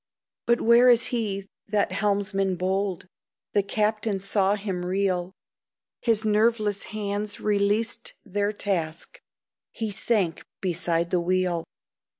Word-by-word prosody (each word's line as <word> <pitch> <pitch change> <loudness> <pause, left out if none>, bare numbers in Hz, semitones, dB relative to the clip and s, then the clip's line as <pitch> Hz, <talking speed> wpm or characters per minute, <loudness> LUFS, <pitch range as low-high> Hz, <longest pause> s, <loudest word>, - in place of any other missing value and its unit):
But 235 0 +3
where 235 +2 +6
is 240 -1 +6
he, 200 -5 -1 0.2
that 205 0 +1
helmsman 195 -2 0
bold? 190 0 -1 0.5
The 205 - +4
captain 210 0 0
saw 195 +1 +1
him 195 -3 -4
reel, 185 -1 0 0.7
His 225 -2 +1
nerveless 215 -1 +2
hands 205 0 -2
released 210 +2 0
their 205 0 0
task, 190 - -3 0.5
He 220 -3 -4
sank 195 -4 0 0.2
beside 170 -2 0
the 180 - +2
wheel. 180 -1 0
200 Hz, 115 wpm, -26 LUFS, 185-215 Hz, 0.7 s, where